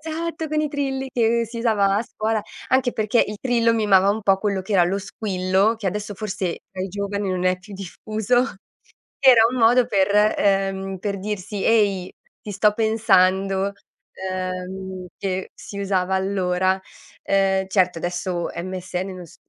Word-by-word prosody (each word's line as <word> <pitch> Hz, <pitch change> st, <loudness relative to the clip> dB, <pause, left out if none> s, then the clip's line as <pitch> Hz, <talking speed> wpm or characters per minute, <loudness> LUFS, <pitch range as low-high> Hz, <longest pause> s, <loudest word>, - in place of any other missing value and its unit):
esatto, 320 Hz, 0 st, -4 dB
con 305 Hz, 0 st, 0 dB
i 305 Hz, -, 0 dB
trilli 270 Hz, -2 st, -2 dB
che 230 Hz, -1 st, +2 dB
si 230 Hz, +1 st, -7 dB
usava 205 Hz, -4 st, +2 dB
a -, -, 0 dB
scuola, 220 Hz, -2 st, -2 dB, 0.3 s
anche 260 Hz, -1 st, +2 dB
perché 215 Hz, +2 st, +2 dB
il 210 Hz, -, -6 dB
trillo 235 Hz, -2 st, +2 dB
mimava 200 Hz, -3 st, +4 dB
un 220 Hz, +2 st, -1 dB
po' 195 Hz, -2 st, +3 dB
quello 200 Hz, -2 st, -1 dB
che 200 Hz, -, -5 dB
era 190 Hz, -3 st, +5 dB
lo 185 Hz, +3 st, +1 dB
squillo, 195 Hz, +1 st, 0 dB
che 220 Hz, -, -5 dB
adesso 205 Hz, +2 st, -3 dB
forse 190 Hz, -4 st, -3 dB
tra 185 Hz, -1 st, -4 dB
i 190 Hz, -, -3 dB
giovani 200 Hz, 0 st, -3 dB
non 185 Hz, 0 st, -2 dB
è 185 Hz, 0 st, +3 dB
più 205 Hz, +2 st, -13 dB
diffuso, 215 Hz, +5 st, -1 dB, 0.8 s
che 275 Hz, -1 st, +6 dB
era 235 Hz, -3 st, +7 dB
un 255 Hz, -, -4 dB
modo 240 Hz, +2 st, +5 dB
per 200 Hz, -4 st, +1 dB, 0.3 s
ehm, 195 Hz, -1 st, 0 dB
per 200 Hz, 0 st, -3 dB
dirsi: 205 Hz, 0 st, -4 dB
"Ehi, 200 Hz, -5 st, +2 dB, 0.3 s
ti 210 Hz, -, -7 dB
sto 210 Hz, +2 st, +3 dB
pensando," 195 Hz, -3 st, +2 dB, 0.6 s
uhm, 185 Hz, 0 st, -5 dB
che 190 Hz, -1 st, -3 dB
si 200 Hz, -, -8 dB
usava 190 Hz, -1 st, 0 dB
allora. 190 Hz, -1 st, 0 dB, 0.4 s
Uhm, 190 Hz, -1 st, +1 dB
certo 185 Hz, -3 st, +2 dB
adesso 175 Hz, 0 st, -2 dB
MSN 185 Hz, +1 st, -4 dB
non 180 Hz, -1 st, -9 dB
s 165 Hz, -, -17 dB
200 Hz, 165 wpm, -22 LUFS, 190-220 Hz, 0.8 s, era